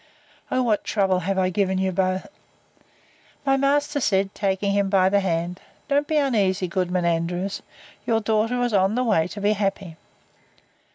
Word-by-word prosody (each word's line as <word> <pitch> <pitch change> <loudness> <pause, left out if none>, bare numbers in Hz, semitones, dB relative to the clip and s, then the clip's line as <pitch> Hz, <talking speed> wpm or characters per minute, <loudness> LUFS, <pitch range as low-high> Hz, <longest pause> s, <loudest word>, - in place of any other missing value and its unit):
(O 255 0 +1
what 220 -4 +1
trouble 190 -3 +1
have 190 +2 -2
I 185 -1 +1
given 190 0 0
you 190 0 0
both!) 185 0 -1 1.2
My 270 -1 +3
master 285 +2 +1
said, 195 -5 +1
taking 195 0 -1
him 200 -1 +1
by 190 -1 +3
the 200 +1 +3
hand, 175 -1 -2 0.3
Don't 290 0 +1
be 310 - 0
uneasy, 200 -10 +1
Goodman 180 0 -1
Andrews; 175 +3 -1 0.5
your 225 -1 +2
daughter 225 +3 0
is 240 -2 -1
in 195 +2 +2
the 250 - +1
way 200 -9 +2
to 205 - -8
be 205 +1 +2
happy. 195 -4 -3
195 Hz, 165 wpm, -23 LUFS, 185-225 Hz, 1.2 s, My